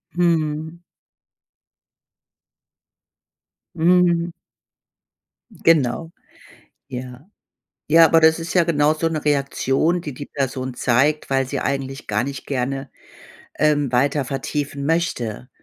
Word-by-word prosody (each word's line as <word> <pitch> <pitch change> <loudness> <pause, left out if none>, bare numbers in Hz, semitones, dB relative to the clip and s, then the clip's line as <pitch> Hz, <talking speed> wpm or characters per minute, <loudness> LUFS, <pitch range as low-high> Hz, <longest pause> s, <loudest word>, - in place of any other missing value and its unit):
Mhm. 160 -1 0 3.0
Mhm. 175 0 +3 1.2
Genau. 160 0 +1 0.8
Ja. 125 +3 -8 0.6
Ja, 165 +1 +8
aber 165 0 +5
das 160 0 +5
ist 165 0 -5
ja 180 -2 +4
genau 150 -2 +2
so 165 +1 0
'ne 155 -2 -4
Reaktion, 145 +3 +1
die 150 -4 -6
die 145 +3 -8
Person 130 -2 -3
zeigt, 135 +6 +1
weil 135 -1 +1
sie - - -3
eigentlich 135 0 -3
gar 105 0 0
nicht 135 +1 -6
gerne, 135 0 -3 0.7
ähm, 145 -3 +2
weiter 140 +3 +1
vertiefen 140 +1 -4
möchte. 130 - -2
145 Hz, 105 wpm, -21 LUFS, 135-165 Hz, 3.0 s, Ja